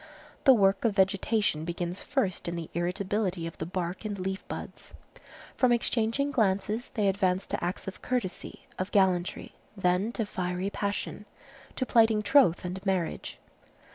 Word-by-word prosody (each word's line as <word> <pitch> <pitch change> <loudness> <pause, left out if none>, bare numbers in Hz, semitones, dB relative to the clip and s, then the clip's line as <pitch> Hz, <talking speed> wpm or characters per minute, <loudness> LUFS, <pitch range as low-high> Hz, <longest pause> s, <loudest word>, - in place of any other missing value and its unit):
The 270 - +9
work 195 -2 +3
of 225 -4 +2
vegetation 195 -2 +2
begins 175 +2 -3
first 210 -13 -1
in 170 - -2
the 165 -2 -6
irritability 180 +1 -1
of 165 - -6
the 160 - -3
bark 180 +1 -3
and 210 -2 -3
leaf 190 +1 -3
buds. - - -8 0.6
From 255 -2 +3
exchanging 235 +3 +1
glances, 210 0 0
they 210 -4 +2
advance 190 -1 +1
to - - -3
acts 180 +3 -3
of 195 - -7
courtesy, 240 -8 -3
of 185 +1 -2
gallantry, 185 -3 +1 0.2
then 185 +3 +1
to 225 - -1
fiery 180 0 -2
passion, 205 +1 -3 0.5
to 260 - -1
plighting 225 -3 +4
troth 230 - +4
and 185 +1 -5
marriage. 190 -4 -2
195 Hz, 150 wpm, -29 LUFS, 180-220 Hz, 0.6 s, The